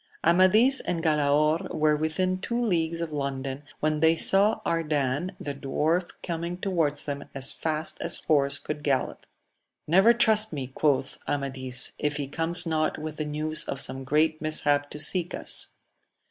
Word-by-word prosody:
MADIS 185 +10 +4
and 165 -2 -3
Galaor 150 0 +1
were 150 0 +2
within 185 +5 -1
two 235 +5 -3
leagues 170 -7 -1
of 165 -2 -4
London 135 -1 -4 0.2
when 155 0 0
they 160 +1 +4
saw 200 +5 +4
Ardan 150 +1 -1
the 145 - -5
dwarf 155 +6 -1
coming 170 +1 -4
towards 165 -7 -1
them 140 -1 -5
as 135 0 +2
fast 160 0 -3
as 170 - +1
horse 140 -2 +1
could 150 0 -6
gallop. 140 -3 -2 0.6
Never 190 +8 +5
trust 220 -2 +2
me, 140 -3 -4
quoth 140 -3 0
Amadis, 130 -2 0
if 150 0 -1
he 145 -2 -3
comes 165 +5 0
not 155 -1 -1
with 155 0 -7
the 155 - -3
news 155 +1 -1
of 135 - -4
some 135 0 -1
great 155 +3 +1
mishap 145 -2 +2
to 150 - -8
seek 175 +3 0
us. - - +3
155 Hz, 160 wpm, -26 LUFS, 145-170 Hz, 0.6 s, Never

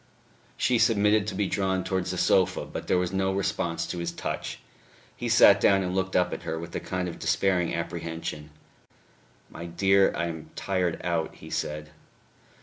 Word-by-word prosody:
She 125 -2 +2
submitted 105 -1 +3
to 100 - -3
be 100 +1 +1
drawn 95 -1 0
towards 95 -2 -1
the 90 - -3
sofa, 95 +1 +2
but - - -7
there - - +3
was 90 +1 -1
no 95 0 +1
response 90 -3 -1
to 90 - -5
his 85 0 -2
touch. - - -5 0.6
He - - -4
sat - - +7
down 95 -1 +4
and 90 0 -2
looked 95 0 -1
up 90 - +2
at - - -5
her 80 - -3
with 85 +1 -7
a - - 0
kind 90 -1 -3
of 85 - -7
despairing 90 -4 +1
apprehension. 80 -3 -5 1.0
"My 85 +1 -7
dear, 95 +3 +3
I 85 - -1
am 80 -2 -6
tired 90 -3 -1
out," 85 -2 -1
he - - -12
said. 75 0 -3
90 Hz, 180 wpm, -27 LUFS, 85-95 Hz, 1.0 s, sat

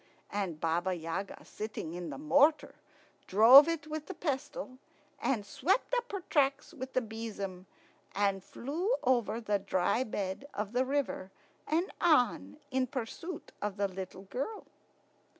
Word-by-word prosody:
And 190 -6 -2
Baba 175 +3 0
Yaga, 170 +4 -5
sitting 210 -6 -5
in 175 0 -5
the - - -6
mortar, 295 0 +3 0.5
drove 240 - +9
it 330 -3 -1
with 310 0 -5
the 380 - -6
pestle, 275 - -3 0.4
and 220 -6 0
swept 370 - 0
up 485 0 0
her 395 -2 -3
tracks 280 -5 +1
with 260 0 -7
the 255 - +2
besom, 210 -5 -6 0.5
and 195 -1 +1
flew 340 - -1
over 240 -4 +2
the 210 -3 0
dry 195 +4 +1
bed 205 +2 -4
of 210 0 -3
the 255 +1 +2
river 270 -8 -1 0.4
and 335 +4 +1
on 245 - +3
in 260 0 +1
pursuit 275 +7 -6
of 205 -1 -2
the 200 0 +1
little 190 0 -7
girl. 275 - -4
240 Hz, 145 wpm, -32 LUFS, 195-290 Hz, 0.5 s, drove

